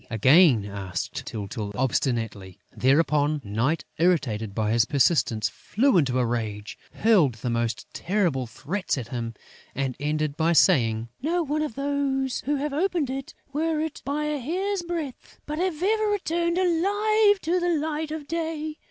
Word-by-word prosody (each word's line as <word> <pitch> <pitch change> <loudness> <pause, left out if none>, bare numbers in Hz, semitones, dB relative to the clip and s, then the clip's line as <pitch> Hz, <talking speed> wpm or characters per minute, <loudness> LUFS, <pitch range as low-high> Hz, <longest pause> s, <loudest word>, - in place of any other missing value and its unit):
again 130 - +5
asked 95 -4 -5
Tyltyl, 105 0 -5
obstinately. 115 -7 -1 0.2
Thereupon, 145 +2 +2
Night, 115 +10 -1
irritated 115 - +1
by 110 -1 0
his 115 -1 +4
persistency, 120 - +2
flew 260 +4 +1
into 135 -7 +3
a 125 - +2
rage, 110 -3 -3 0.2
hurled 185 - +3
the 120 +2 -3
most 115 -1 -1
terrible 170 - 0
threats 150 - -3
at 120 -3 -5
him, 115 -2 -4 0.4
and 135 -2 -2
ended 150 0 -1
by 165 +2 +2
saying: 115 - +3
"Not 335 +4 0
one 300 +2 0
of 300 -8 -3
those 275 -2 -1
who 295 - +2
have 285 +1 -2
opened 330 -3 0
it, 270 0 -6 0.2
were 315 +1 0
it 315 -1 -4
but 280 - -4
by 300 +1 -1
a 300 -1 -1
hair's 375 +8 -2
breadth, 335 -6 -6
has 325 +2 -2
ever 435 +2 +2
returned 345 -4 0
alive 410 +4 +3
to 345 +3 +1
the 350 0 0
light 310 +1 -2
of 305 -2 -6
day! 320 -1 -3
185 Hz, 155 wpm, -25 LUFS, -, 0.4 s, again